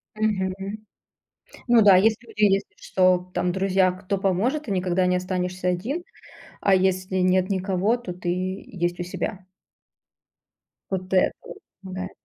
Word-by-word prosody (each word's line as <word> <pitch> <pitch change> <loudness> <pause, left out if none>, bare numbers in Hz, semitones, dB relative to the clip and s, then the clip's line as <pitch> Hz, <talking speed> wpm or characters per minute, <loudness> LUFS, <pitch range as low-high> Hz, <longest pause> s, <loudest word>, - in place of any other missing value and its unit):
Мгм. 205 -4 0 1.2
Ну 240 -2 +6
да, 200 -2 +8
если 220 +4 +2
у - - -12
тебя, 210 -1 +4
если 195 0 0
что, 185 -1 +2
там 180 0 0
друзья, 190 0 +2
кто 185 +1 -3
поможет, 200 +11 0
ты 230 - -7
никогда 185 0 +1
не 180 0 +2
останешься 180 0 -2
один, 230 - -2 0.6
а 195 - +4
если 185 0 0
нет 185 +1 +2
никого, 195 +4 +1
то 195 -7 -7
ты 175 0 -5
есть 180 -1 -3
у - - -1
себя. 185 +1 -5 1.4
Вот 185 -1 -4
это 185 - +4
вот - - -10 0.2
помогает. 185 -1 -6
185 Hz, 145 wpm, -24 LUFS, 180-195 Hz, 1.4 s, да